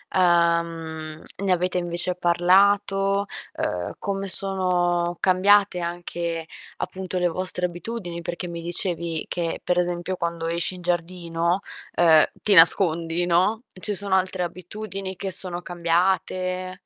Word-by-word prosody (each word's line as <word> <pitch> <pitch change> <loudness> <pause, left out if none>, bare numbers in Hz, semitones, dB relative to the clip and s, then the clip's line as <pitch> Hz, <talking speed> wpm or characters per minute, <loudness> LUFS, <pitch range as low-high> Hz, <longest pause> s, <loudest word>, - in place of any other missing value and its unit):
ehm, 170 -3 +1 0.2
ne 190 - +1
avete 180 0 +1
invece 175 +1 -2
parlato? 195 +3 +3 0.3
Ehm, 90 -1 -3
come 195 0 -3
sono 175 -3 +2
cambiate 195 0 +4
anche, 170 -1 -4 0.3
appunto, 185 -1 -4
le 180 - +2
vostre 180 +1 -1
abitudini? 175 -1 -5
Perché 175 +2 -5
mi 170 -1 -6
dicevi 170 -1 -3
che, 170 -2 -3
per 180 - 0
esempio, 175 +1 -2
quando 170 -1 -3
esci 170 +2 -1
in 180 - -10
giardino, 175 0 -1 0.4
uhm, 160 -3 +7 0.2
ti 210 - +2
nascondi, 170 -1 +5
no; 185 +7 +2 0.2
ci 210 - -1
sono 200 -1 0
altre 185 -1 0
abitudini 190 +2 -6
che 195 - -4
sono 180 -1 -3
cambiate? 185 +1 -1
175 Hz, 125 wpm, -24 LUFS, 170-190 Hz, 0.4 s, uhm